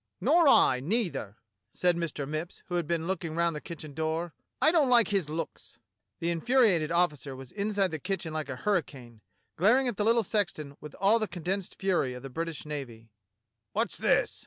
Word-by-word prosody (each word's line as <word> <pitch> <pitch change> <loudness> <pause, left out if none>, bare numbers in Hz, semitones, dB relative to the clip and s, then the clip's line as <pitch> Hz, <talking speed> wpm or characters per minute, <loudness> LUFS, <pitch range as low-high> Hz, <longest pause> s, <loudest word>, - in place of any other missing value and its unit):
"Nor 335 -2 +4
I, 130 - +6
neither," 165 - -2 0.4
said 180 -1 +2
Mr. 155 -5 -3
Mipps, 155 +4 -5
who 175 - -8
had 175 -3 0
been 165 -1 -1
looking 170 -3 -3
round 170 -1 +1
the 150 - -5
kitchen 155 -3 -8
door. 160 +2 -2 0.3
"I 310 - +5
don't 310 -6 +3
like 240 -2 +5
his 195 -7 0
looks." 160 +1 -6 0.4
The 170 +1 0
infuriated 180 -3 +3
officer 150 -6 0
was 130 -1 -10
inside 200 -2 0
the 155 - -4
kitchen 180 -2 -3
like 155 -2 -3
a - - -3
hurricane, 130 - -2 0.4
glaring 235 +10 +4
at 240 - -2
the 210 - +1
little 230 +1 +3
sexton 170 -9 -2
with 150 - -9
all 205 +4 +3
the 215 - -1
con 175 -2 -8
densed 190 +2 -2
fury 180 -10 0
of 125 - -9
the 135 - -7
British 165 +1 -4
navy. 120 -7 -7 0.6
"What's - - -1
this. - - +1
170 Hz, 190 wpm, -29 LUFS, 150-200 Hz, 0.6 s, I